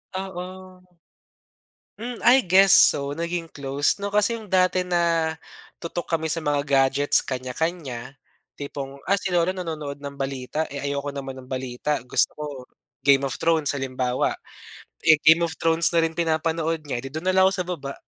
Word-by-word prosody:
Oo. 190 -1 -5 1.6
Hmm. 240 0 -5
I 255 +2 +7
guess 190 +2 +5
so 140 0 +5
naging 170 +1 -3
close, 140 +6 -1
'no, 200 - -2
kasi 210 +3 +2
yung 220 -3 -8
dati 185 0 +3
na 170 -3 +1 0.4
tutok 170 0 -5
kami 160 0 -4
sa 165 - -2
mga 145 -1 0
gadgets 135 +1 +3
kanya-kanya, 130 0 -4 0.4
tipong, 140 -1 -6
ah, 200 - +3
si - - -3
lola 175 +1 +2
nanonood 155 -6 -5
ng 140 -1 -7
balita, 135 +3 -3
eh, 140 - -5
ayoko 140 0 -3
naman 135 -1 -6
ng 130 - -12
balita, 130 +3 -2
gusto 125 - +1
ko 150 - -7 0.6
Game 140 -1 +5
of 120 - -5
Thrones, 160 -3 +1
halimbawa. 130 -1 -1 0.7
Eh, 160 - +8
Game 160 +2 +6
of 165 - -4
Thrones 165 0 +2
na 165 - +5
rin 165 0 -1
pinapanood 165 0 0
niya, 125 -4 -3
edi 135 - -7
dun 155 +4 -6
na 185 - +2
lang 190 0 +5
ako 190 - +1
sa 180 -2 -2
baba, 140 -6 -5
155 Hz, 170 wpm, -24 LUFS, 140-175 Hz, 1.6 s, Eh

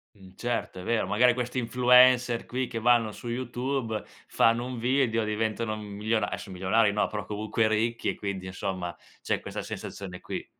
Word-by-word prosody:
Mh, 95 -2 -16
certo, 115 -5 -3
è - - -7
vero. 115 -1 0
Magari 120 +5 +4
questi 125 +1 -3
influencer 125 0 +5
qui 130 +1 -2
che 115 - -5
vanno 115 -1 +3
su 120 - -8
YouTube 120 -1 -2 0.2
fanno 115 +1 +3
un 125 -1 -5
video, 120 -1 +1
diventano 110 +1 -1
m 110 - -7
miliona 110 0 0
adesso 95 - -6
milionari, 100 +4 +2
no, 105 - +1
però 105 -1 -5
comunque 110 +1 0
ricchi 115 +2 0
e - - -2
quindi 100 -2 -4
insomma 95 -2 -4 0.3
c'è - - 0
questa - - -6
sensazione 90 -2 -7
qui. - - -6
115 Hz, 175 wpm, -28 LUFS, 105-120 Hz, 0.3 s, influencer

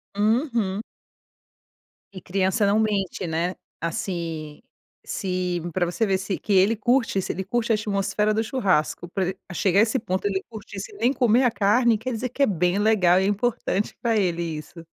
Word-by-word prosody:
Uhum. 220 -2 +1 1.3
E 185 - -7
criança 190 +2 +1
não 210 +2 +3
mente, 200 -4 -1
né. 170 +2 -1 0.3
Assim, 165 -4 -4 0.4
se 180 -2 -2
pra 185 - +1
você 175 +6 0
ver 190 -2 +1
se 190 0 -3
que 205 - -2
ele 195 +4 +4
curte 230 -1 +1
se - - -3
ele 190 - -4
curte 235 +3 -1
a - - +5
atmosfera 210 0 0
do 220 - +1
churrasco, 185 - 0
pra 185 -1 -1
el 190 - -4 0.2
chegar 190 +2 +2
a - - +8
esse 230 +4 +1
ponto, 185 -5 -3
ele 195 -2 0
curtir 220 -2 -9
se 440 - -7
nem 255 -10 +1
comer 245 -2 +3
a 245 - +5
carne, 225 +3 +3
quer 240 +4 -4
dizer 235 +2 -3
que 280 +3 0
é - - +7
bem 180 -1 +1
legal 200 -4 +4
e 190 - +1
é - - +1
importante 205 -1 -1
pra 230 -2 +1
ele 175 -4 +1
isso. 165 +1 -7
200 Hz, 190 wpm, -24 LUFS, 180-225 Hz, 1.3 s, a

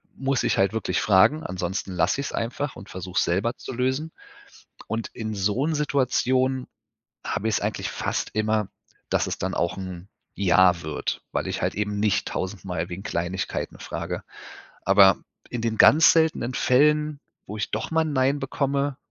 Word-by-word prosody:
muss 135 0 0
ich - - +1
halt 95 +1 +2
wirklich 110 - -1
fragen, 110 +10 +4
ansonsten 90 +1 -3
lasse 90 +8 +1
ich's 140 - -4
einfach 125 +5 -3
und 100 - -11
versuche 90 0 -6
es - - +3
selber 100 +8 0
zu - - -7
lösen. 130 +6 -1 0.8
Und 115 0 -3
in 110 -2 -4
so 105 +6 0
'n 160 - 0
Situationen 130 -2 +1 0.6
habe 110 - -2
ich 110 - +1
es - - -1
eigentlich - - -2
fast - - -2
immer, 110 -1 +1 0.4
dass - - +1
es - - -3
dann - - -2
auch 85 - -1
'n 95 -1 -7 0.3
Ja 95 -2 +4
wird, 80 -1 -3
weil - - -1
ich - - -3
halt - - -1
eben 105 0 -2
nicht 105 -1 +1
tausendmal 95 -2 -4
wegen 90 +2 -6
Kleinigkeiten 90 -2 -3
frage. - - -5 0.6
Aber 95 -1 +6 0.3
in 120 - -3
den 115 -1 -2
ganz 160 +3 +8
seltenen 160 -6 +1
Fällen, 150 +3 +3 0.3
wo 105 - -6
ich 105 - -3
doch 110 +8 -3
mal 160 - +3
'n 155 -1 -2
Nein 135 +1 +2
bekomme, 140 0 -1
110 Hz, 175 wpm, -25 LUFS, 95-135 Hz, 0.8 s, ganz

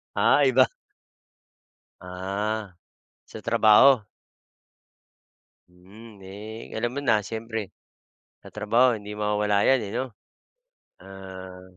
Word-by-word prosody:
Ah, 145 - +4
iba. 130 0 +4 1.3
Ah, 95 +2 -4 0.5
sa 110 - -11
trabaho? 115 +3 +5 1.7
Hmm, 100 +6 -16
eh, 105 +4 -10
alam 120 +2 -2
mo - - -2
na 115 -5 +3
siyempre. 110 -1 -6 0.7
Sa - - -13
trabaho 115 +3 +2
hindi 105 0 -9
mawawala 105 -1 0
'yan, 135 0 +4
eh, 100 - -7
no? 125 +3 -1 0.9
Ah 95 -1 -11
105 Hz, 95 wpm, -25 LUFS, 95-115 Hz, 1.7 s, trabaho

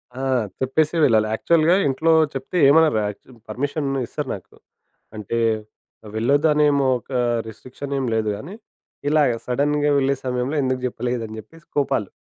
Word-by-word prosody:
ఆ! - - -7 0.4
చెప్పేసే 150 +5 +1
వెళ్ళాలి 110 -2 +3
యాక్చువల్‌గా 165 +7 +3
ఇంట్లో 155 +5 +1 0.2
చెప్తే 135 +7 -4
ఏమనరు 150 -5 +5
యాక్చు 105 +5 -9 0.2
పర్మిషన్ 140 +2 -2 0.2
ఇస్తరు 145 +4 -5
నాకు. 95 - -14 0.6
అంటే 110 +2 -3 0.8
వెళ్లొద్దనేం 145 +5 +3 0.2
ఒక 125 - -8 0.4
రిస్ట్రిక్షన్ 130 +5 -8
ఏమి 130 -3 -1
లేదు 110 -1 0
గాని 170 - -9 0.5
ఇలాగా 145 -6 +3
సడెన్‌గా 145 +3 +1
వెళ్ళే 140 0 +2
సమయంలో 125 +3 -1
ఎందుకు 130 0 0
జెప్పలేదని 120 -3 -3
చెప్పేసి 165 +8 -16
కోపాలు. 115 -8 0
135 Hz, 130 wpm, -22 LUFS, 120-150 Hz, 0.8 s, ఏమనరు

